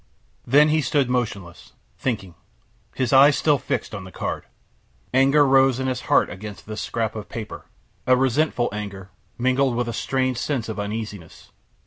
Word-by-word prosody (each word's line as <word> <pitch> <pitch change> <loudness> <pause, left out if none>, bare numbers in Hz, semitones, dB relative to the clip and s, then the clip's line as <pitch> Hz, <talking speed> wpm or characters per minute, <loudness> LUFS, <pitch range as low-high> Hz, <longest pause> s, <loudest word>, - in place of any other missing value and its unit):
Then 145 +5 +5
he 155 +1 +2
stood 140 -4 +1
motionless, 100 -8 -4 0.3
thinking, 95 -8 -3 0.6
his 130 0 0
eyes 140 +2 +7
still 145 -3 +2
fixed - - -3
on 100 -3 -6
the 95 - -11
card. - - -4 0.7
Anger 135 +3 +5
rose 135 -1 +4
in 130 - -2
his 130 -1 -2
heart 145 - +4
against 100 +3 -9
this 110 0 -5
scrap 110 -1 -2
of 105 -1 -7
paper 110 -2 -7 0.4
a 130 0 +5
resentful 130 0 +1
anger, 100 -2 -7 0.3
mingled 130 +1 +1
with 120 0 -1
a 120 - -3
strange 130 0 -1
sense 130 -5 -2
of 110 - -5
uneasiness. 105 -4 -6
125 Hz, 160 wpm, -23 LUFS, 105-135 Hz, 0.7 s, eyes